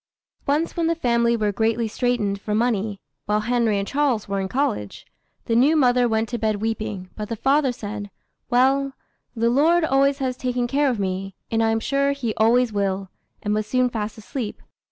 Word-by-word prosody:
Once 300 +4 0
when 335 -1 +1
the 335 - +1
family 235 -5 +2
were 210 -2 +1
greatly 225 +2 0
straitened 215 -4 -1
for 210 0 -2
money, 215 -3 0 0.3
while 210 +1 +2
Henry 235 -2 +1
and 200 0 -2
Charles 275 -6 0
were 200 0 -1
in 190 - -2
college, 190 - -2 0.4
the 230 - 0
new 275 +7 +5
mother 250 -4 +4
went 220 0 0
to 240 - -3
bed 215 -1 +1
weeping, 210 -3 -4
but 210 -1 -5
the 230 - -2
father 270 +3 +2
said, 205 -3 -6 0.4
"Well, 270 +2 +3 0.4
the 230 +1 +2
Lord 320 +6 +4
always 275 -1 +3
has 260 -2 -2
taken 250 -1 -1
care 280 +3 +2
of 240 -4 -1
me, 190 0 -3 0.2
and 225 0 +2
I 225 - +3
am 225 0 +1
sure 280 +4 +1
He 245 -6 -3
always 230 +2 +3
will," 195 -1 -1 0.3
and 210 -1 0
was 215 0 -1
soon 255 +2 +1
fast 220 -1 -4
asleep. 220 +1 -6
230 Hz, 195 wpm, -23 LUFS, 210-260 Hz, 0.4 s, new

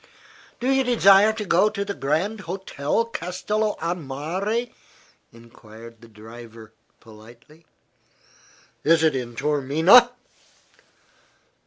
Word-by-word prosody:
"Do 245 - -3
you 270 0 +2
desire 210 -4 +4
to 215 -1 -6
go 190 +3 +2
to 200 -1 -5
the 200 - -4
Grand 180 +9 -2
Hotel 185 0 -3
Castello 210 +2 -3
a 170 +1 -2
Mare?" 180 - -4 0.6
enquired 115 -1 -16
the 115 - -15
driver, 115 0 -14 0.3
politely. 120 +9 -18 1.2
"Is 160 +1 +3
it 155 -3 +2
in 120 -2 -5
Taormina?" 150 - +4
160 Hz, 105 wpm, -22 LUFS, -, 1.2 s, desire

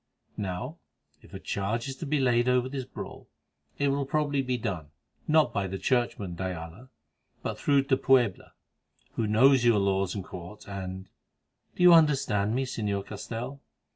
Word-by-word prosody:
Now, 105 - -4 0.4
if - - -18
a - - -7
charge 110 +6 -2
is 135 - -5
to 160 - -6
be 150 +1 +1
laid 120 -1 +3
over 125 0 +2
this 130 -1 -4
brawl, - - -9 0.5
it 145 - +1
will 140 0 -1
probably 145 -1 +1
be 125 -1 -1
done, 95 -10 -4 0.4
not 155 -1 +4
by 100 -3 -1
the 95 +1 -4
churchman, 120 -6 0
de 85 - -5
Ayala, 90 +7 -7 0.5
but - - -4
through 140 -1 +3
de 135 -1 +2
Puebla, 125 -9 +2 0.6
who 115 - -1
knows 125 +4 +5
your 120 -3 +5
laws 100 -1 +1
and 100 - -4
Court, 90 +4 -10
and—do 95 - -8
you 180 -1 +9
understand 130 -10 +3
me, 135 +1 0
Señor 105 -5 -2
Castell?" 120 +6 -6
120 Hz, 165 wpm, -28 LUFS, 100-135 Hz, 0.6 s, you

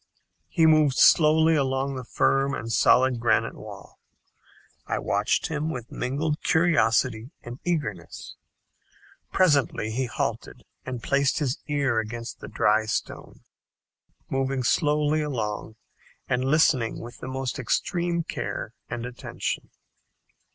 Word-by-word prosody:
He 165 -3 +2
moved 155 -4 +4
slowly 160 +1 +5
along 135 -1 0
the 130 -1 -5
firm 135 +3 +1
and 115 0 -5
solid 125 0 +4
granite 115 -1 +1
wall. - - -12 0.9
I - - -1
watched 100 +1 0
him 155 0 -2
with 125 -6 -6
mingled 150 +4 -2
curiosity 125 -8 +2
and 120 +2 -8
eagerness. 140 - -4 1.0
Presently 140 -10 +2
he 130 +3 -1
halted - - -4 0.2
and 125 -3 -5
placed 140 -1 +1
his 145 -3 -1
ear 140 -6 +1
against 115 +1 -6
the - - -9
dry 110 0 +2
stone, - - -4 0.9
moving 135 -1 -1
slowly 150 +3 +2
along 110 -7 -4 0.5
and 125 +1 0
listening 135 -5 +2
with 120 +1 -10
the - - -7
most 130 +1 -4
extreme 170 +7 -1
care - - -5 0.2
and 120 0 -4
attention. 125 0 -5
130 Hz, 120 wpm, -25 LUFS, 120-150 Hz, 1.0 s, slowly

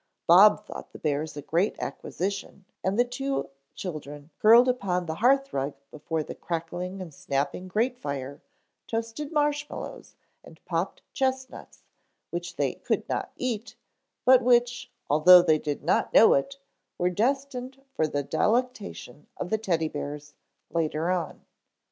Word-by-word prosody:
Bob 205 +4 +7
thought - - -9
the - - -9
bears 150 0 -2
a 145 - -6
great 175 +8 +1
acquisition 195 +1 -5 0.2
and 190 +2 0
then 245 - +4
the - - -15
two 270 - -3 0.2
children, 150 -3 -7
curled 230 +4 +7
upon 190 -8 0
the 160 - -3
hearth 275 +3 +3
rug 135 +1 -2 0.2
before 155 +1 -3
the - - -7
crackling 175 +3 -5
and 175 -5 -8
snapping 140 +7 -2
grate 235 +6 0
fire, 140 - -5 0.5
toasted 230 +6 -4
marshmallows 295 -1 -2 0.3
and - - -15
popped - - -2
chestnuts 260 -1 -3 0.5
which 175 +1 -5
they - - 0
could - - -2
not - - -3
eat, 230 -2 -3 0.5
but 255 0 +7
which, 245 0 +2 0.2
although 175 +5 +8
they 155 -3 +3
did 145 -1 -4
not - - +1
know - - +8
it, 275 - -1 0.4
were 180 +1 +1
destined 260 +4 -1
for 155 - +1
the 145 -1 -2
delectation 205 - -2
of 180 - -5
the 220 - +3
Teddy 170 -7 0
bears 145 0 -6 0.4
later 165 +1 0
on. 175 -4 -3
185 Hz, 145 wpm, -27 LUFS, 155-245 Hz, 0.5 s, although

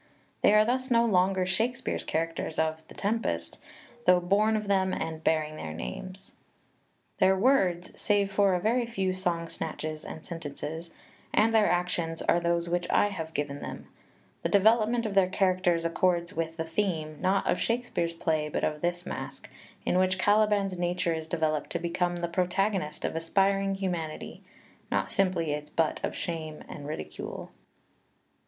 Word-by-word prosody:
They 210 - +5
are 215 0 +6
thus 255 +3 0
no 235 -1 +4
longer 190 -3 +3
Shake 220 +7 +1
speare's 255 - -3
characters 165 0 -2
of 160 0 0
"The - - -14
Tempest," 225 +3 -2 0.5
though 180 0 +7
born 205 +5 +2
of 210 -1 -4
them 190 -1 +2
and 160 -1 -4
bearing 155 -1 +1
their 80 - -6
names. 185 - -7 0.9
Their 190 0 +5
words 190 -7 +2
[save 200 -2 +2
for 195 -1 +3
a - - +1
very 235 +5 +1
few 195 -5 -1
song 175 -3 -1
snatches 155 -1 -5
and 160 - -8
sentences] 160 0 -6 0.4
and 225 +1 +3
their 220 -2 +5
actions 175 -2 -1
are 170 - +3
those 170 0 0
which 175 0 -1
I 205 - +4
have 160 -5 -6
given 145 -1 -2
xvi - - -10
PREFACE - - -4
them; - - -22 0.5
the - - -1
development 225 +3 +4
of 210 - -2
their 195 -2 +4
characters 185 -3 +2
accords 175 +1 +1
with 165 -2 -3
the 160 - -1
theme 165 -3 -2
not 190 +2 +2
of - - +1
Shakespeare's 230 -8 -1
play 155 -2 0
but - - -2
of 150 -1 -1
this 175 +1 -1
Masque, - - -7 0.3
in 180 - +2
which 185 0 +2
Caliban's 205 -2 +2
nature 175 -1 0
is 160 -1 -4
developed 155 -2 0
to - - +1
become 175 +1 -1
the 175 0 -2
protagonist 180 -1 0
of - - -2
aspiring 195 +4 +1
humanity, 175 -5 -4 0.5
not 95 -1 0
simply 180 - +1
its 150 0 -4
butt 160 -1 0
of - - -2
shame 160 -4 -5
and 145 -1 -8
ridicule. 155 - -6
180 Hz, 170 wpm, -28 LUFS, 165-195 Hz, 0.9 s, though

